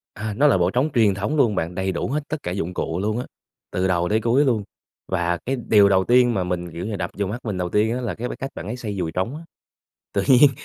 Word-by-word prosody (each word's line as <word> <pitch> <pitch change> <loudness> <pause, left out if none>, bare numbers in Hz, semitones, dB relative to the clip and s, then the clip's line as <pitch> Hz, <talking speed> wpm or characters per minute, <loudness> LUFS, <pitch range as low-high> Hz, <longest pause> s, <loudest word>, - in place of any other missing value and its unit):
À, 110 +1 -4
nó 140 +8 +4
là 95 - +4
bộ 90 0 +2
trống 135 +6 +1
truyền 110 -5 +4
thống 100 +10 -2
luôn 120 -8 +3
bạn, 85 0 -2
đầy 95 0 -1
đủ 85 - -2
hết 145 +3 -2
tất 155 - -1
cả 90 - -3
dụng 90 -1 -3
cụ 80 0 -2
luôn 105 +3 -1
á, 125 - -4 0.5
từ 95 +1 0
đầu 90 -1 +1
tới 110 +1 +2
cuối 125 +6 +3
luôn. 115 -5 +1 0.4
Và 85 -2 0
cái 135 - 0
điều 100 -2 +6
đầu 95 -1 +4
tiên 120 +1 +4
mà 95 -4 0
mình, 90 -1 -3
kiểu 85 +3 -5
như, 105 -1 -3
đập 90 -1 -3
vô 100 - 0
mắt 110 +5 -4
mình 100 -4 -2
đầu 90 -1 -2
tiên 110 +5 +2
á 125 - -3
là 120 - -3
cái 120 +2 -4
cách 135 - -4
bạn 90 - -6
ấy 115 - -3
xoay 105 -5 -5
dùi 85 -3 -2
trống 95 - -2
á, 155 - -8 0.7
tự - - +2
nhiên 135 +2 +7
105 Hz, 280 wpm, -23 LUFS, 90-120 Hz, 0.7 s, nhiên